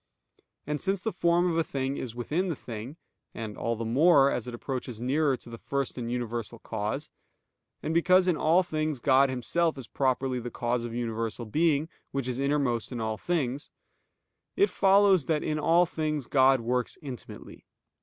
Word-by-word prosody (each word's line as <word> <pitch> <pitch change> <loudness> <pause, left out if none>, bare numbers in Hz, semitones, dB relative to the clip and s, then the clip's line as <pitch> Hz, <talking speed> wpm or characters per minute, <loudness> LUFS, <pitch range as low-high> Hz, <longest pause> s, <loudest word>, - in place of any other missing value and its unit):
And 150 0 -2
since 195 +1 0
the 220 - -1
form 175 0 +2
of - - -1
a - - +3
thing 135 -2 -2
is 120 -3 -5
within 155 +10 -1
the 170 - -1
thing, 120 +4 -8 0.4
and 110 -2 -5
all 115 0 -1
the 115 +1 -4
more, 140 +3 +5
as 125 - -3
it 125 - -5
approaches 125 -2 -5
nearer 135 +2 +1
to - - -16
the 115 -1 -9
First 140 -1 -2
and 120 -2 -4
Universal 120 -1 -3
Cause; 110 +7 -4 0.7
and 155 - -1
because 185 +2 +4
in 180 - +3
all 165 +4 +3
things 155 -4 -2
God 135 +2 +4
Himself 155 +6 0
is 130 - -7
properly 130 -1 0
the 120 0 -5
cause 120 0 -2
of 115 -1 -6
universal 115 -1 -3
being 155 +5 +1 0.2
which 135 -2 -3
is 125 0 -2
innermost 140 -5 0
in 125 - -4
all 110 -1 -2
things; 145 -5 -2 0.9
it 400 +2 +3
follows 195 -4 +4
that 155 -2 0
in 155 0 -1
all 170 +3 +4
things 155 -4 -2
God 130 -1 +4
works 125 +1 -1
intimately. 130 -5 -9
135 Hz, 180 wpm, -28 LUFS, 120-160 Hz, 0.9 s, more